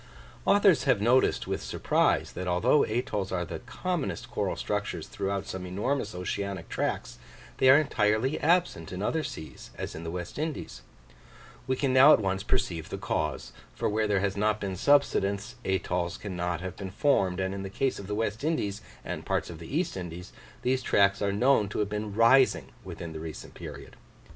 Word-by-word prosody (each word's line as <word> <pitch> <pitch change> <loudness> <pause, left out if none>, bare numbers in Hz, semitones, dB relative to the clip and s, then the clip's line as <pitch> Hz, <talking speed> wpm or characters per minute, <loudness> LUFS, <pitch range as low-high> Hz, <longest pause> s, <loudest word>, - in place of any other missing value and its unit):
Authors 200 -6 +5
have 130 -6 +3
noticed 120 +5 +3
with - - -3
surprise, - - +1
that 90 - -5
although 90 +11 +3
atolls 110 -3 -2
are 90 -2 -1
the 80 -1 -6
commonest 155 - -3
coral - - -1
structures 105 -6 -3
throughout 100 0 -3
some 95 -1 -5
enormous 105 +4 -2
oceanic 95 0 -3
tracts, - - -2 0.4
they 130 - +6
are 135 - +9
entirely 115 -2 +1
absent 170 - +1
in 95 +2 -4
other 160 +8 0
seas, 80 - -8
as - - -5
in 80 - -7
the 85 - -4
West 90 +8 -5
Indies: 155 - -4 0.9
we 130 - +1
can 130 0 0
now 135 +4 +9
at - - +5
once 95 -2 -1
perceive 85 -4 -1
the - - -4
cause, - - -2 0.2
for - - -1
where 110 +1 +1
there 100 -2 +2
has 100 -1 0
not 105 +1 +1
been 95 -2 -3
subsidence, 105 -4 +2
atolls 90 -2 -1
cannot 90 -3 -3
have 95 0 -5
been 95 -2 -6
formed; 95 -5 +2
and 95 0 -1
in 100 - -4
the 95 - -5
case 135 +7 -1
of 100 - -8
the 105 - -2
West 110 +2 -2
Indies 110 -11 -1 0.2
and - - -4
parts - - -1
of 80 - -9
the 85 - -9
East 165 +6 0
Indies, 90 0 -7 0.3
these 130 +1 +1
tracts 100 -4 +3
are 100 -1 +1
known 110 0 +3
to - - -5
have 105 -1 0
been 105 -1 -4
rising 125 +4 +4
within 85 -2 -7
the 80 - -6
recent 80 -2 -8
period. - - -9
100 Hz, 185 wpm, -28 LUFS, 90-130 Hz, 0.9 s, are